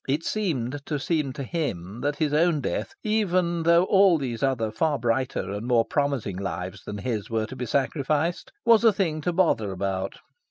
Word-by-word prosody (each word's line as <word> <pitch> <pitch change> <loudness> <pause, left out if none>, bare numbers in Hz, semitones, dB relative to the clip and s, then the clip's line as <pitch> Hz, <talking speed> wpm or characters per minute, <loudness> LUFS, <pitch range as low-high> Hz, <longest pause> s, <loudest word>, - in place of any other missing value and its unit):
It 145 +4 0
seemed 145 - -2
to 150 - -1
seem 150 -1 -1
to 140 - -5
him 120 - -4
that 145 0 0
his 150 -1 0
own 160 0 +3
death, 135 - -3
even 185 -6 +1
though 170 +1 +5
all 190 -2 +5
those 125 -6 -4
other 125 -5 0
far 145 +7 +1
brighter 120 -4 -1
and 105 +4 -4
more 120 -2 +3
promising 140 -10 -1
lives 95 -1 -5
than 105 - -5
his 110 -1 -3
were 110 -1 0
to 130 - -9
be 125 -1 -4
sacrificed, 145 +6 0
was 230 -1 +6
a 225 - +7
thing 170 -6 -1
to 175 - 0
bother 165 - +2
about. 95 0 -3
140 Hz, 190 wpm, -25 LUFS, 115-170 Hz, -, a